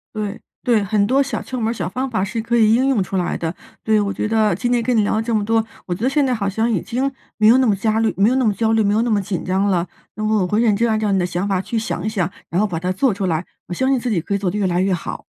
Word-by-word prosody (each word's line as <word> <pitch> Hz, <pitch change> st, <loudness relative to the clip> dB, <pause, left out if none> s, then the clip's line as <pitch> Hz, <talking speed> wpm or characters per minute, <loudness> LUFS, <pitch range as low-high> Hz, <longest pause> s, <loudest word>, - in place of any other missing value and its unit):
对， 210 Hz, 0 st, -4 dB, 0.2 s
对， 235 Hz, -5 st, +2 dB
很 200 Hz, +1 st, +1 dB
多 260 Hz, +6 st, +3 dB
小 270 Hz, -5 st, -2 dB
窍 255 Hz, -, -5 dB
门 220 Hz, -, 0 dB
儿 230 Hz, -, 0 dB
小 180 Hz, -8 st, -3 dB
方 255 Hz, +8 st, -3 dB
法 220 Hz, -6 st, -1 dB
是 225 Hz, +3 st, -3 dB
可 235 Hz, +1 st, 0 dB
以 220 Hz, -1 st, +5 dB
应 255 Hz, +3 st, +3 dB
用 250 Hz, -8 st, +2 dB
出 195 Hz, -, -6 dB
来 180 Hz, -, -1 dB
的， 165 Hz, 0 st, -3 dB, 0.3 s
对。 220 Hz, -1 st, +3 dB
我 200 Hz, -1 st, -1 dB
觉 210 Hz, -, -2 dB
得 215 Hz, -1 st, +2 dB
今 245 Hz, -, -2 dB
天 240 Hz, -1 st, +2 dB
跟 245 Hz, +1 st, 0 dB
你 215 Hz, -, +4 dB
聊 205 Hz, -, 0 dB
了 220 Hz, -, +1 dB
这 230 Hz, +1 st, -2 dB
么 210 Hz, -1 st, 0 dB
多， 225 Hz, +1 st, +2 dB, 0.2 s
我 180 Hz, -, -2 dB
觉 175 Hz, -, -7 dB
得 255 Hz, -, +3 dB
现 280 Hz, +1 st, +2 dB
在 255 Hz, -, +1 dB
好 200 Hz, -4 st, -1 dB
像 220 Hz, +4 st, 0 dB
已 210 Hz, -8 st, 0 dB
经 255 Hz, +4 st, -2 dB, 0.3 s
没 215 Hz, -, +4 dB
有 235 Hz, +3 st, +7 dB
那 260 Hz, -, +3 dB
么 210 Hz, -, +3 dB
焦虑 220 Hz, +2 st, +1 dB
没 200 Hz, +3 st, +4 dB
有 255 Hz, -, +1 dB
那 260 Hz, -1 st, +2 dB
么 215 Hz, -, +3 dB
焦 220 Hz, +2 st, 0 dB
虑， 225 Hz, -1 st, +3 dB
没 205 Hz, 0 st, +2 dB
有 220 Hz, -, +2 dB
那 240 Hz, -, -1 dB
么 205 Hz, -2 st, +2 dB
紧 190 Hz, -1 st, -4 dB
张 190 Hz, +2 st, +1 dB
了。 180 Hz, -3 st, +1 dB, 0.3 s
那 215 Hz, -, -4 dB
么 215 Hz, -1 st, +2 dB
我 180 Hz, -, 0 dB
会 210 Hz, +4 st, +1 dB
认 225 Hz, -3 st, +3 dB
真 230 Hz, +3 st, +1 dB
按 220 Hz, -1 st, +1 dB
照 210 Hz, -2 st, 0 dB
你 195 Hz, -, +2 dB
的 180 Hz, -, +1 dB
想 180 Hz, +2 st, -2 dB
法 190 Hz, -2 st, 0 dB
去 230 Hz, -, -4 dB
想 220 Hz, -5 st, -3 dB
一 -, -, 0 dB
想， 190 Hz, -6 st, -1 dB, 0.2 s
然 175 Hz, -, 0 dB
后 210 Hz, -, +3 dB
把 170 Hz, -5 st, -3 dB
它 180 Hz, +2 st, -2 dB
做 230 Hz, +5 st, +1 dB
出 195 Hz, 0 st, -3 dB
来， 165 Hz, 0 st, -1 dB, 0.2 s
我 -, -, -5 dB
相 260 Hz, +8 st, 0 dB
信 265 Hz, -, +2 dB
自 245 Hz, -, -3 dB
己 205 Hz, -6 st, +1 dB
可 185 Hz, -, -4 dB
以 -, -, +2 dB
做 195 Hz, -2 st, -1 dB
得 195 Hz, -, -3 dB
越 205 Hz, -, 0 dB
来 180 Hz, -1 st, +1 dB
越 190 Hz, 0 st, +1 dB
好。 175 Hz, -, -5 dB
215 Hz, 375 characters per minute, -20 LUFS, 195-230 Hz, 0.3 s, 有